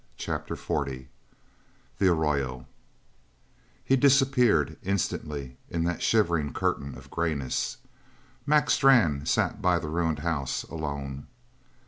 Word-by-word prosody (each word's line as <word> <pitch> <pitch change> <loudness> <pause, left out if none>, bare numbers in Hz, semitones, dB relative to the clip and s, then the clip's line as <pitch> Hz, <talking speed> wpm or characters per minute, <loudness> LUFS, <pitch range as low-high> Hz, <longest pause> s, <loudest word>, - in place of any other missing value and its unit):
CHAPTER - - -4
XL - - -1 1.2
THE 95 - +4
ARROYO 70 -6 -1 1.2
He 135 - +4
disappeared, 125 - +3
instantly, 75 -8 -3
in 85 -1 -1
that 85 0 -2
shivering 85 -9 +2
curtain 70 -1 -2
of - - -15
greyness. 80 -6 -2 0.7
Mac 150 0 +3
Strann 90 - +4
sat - - +1
by 90 -1 +3
the 80 -2 -4
ruined 80 -1 0
house 75 -6 -1
alone. 70 -3 -5
80 Hz, 105 wpm, -27 LUFS, 70-100 Hz, 1.2 s, THE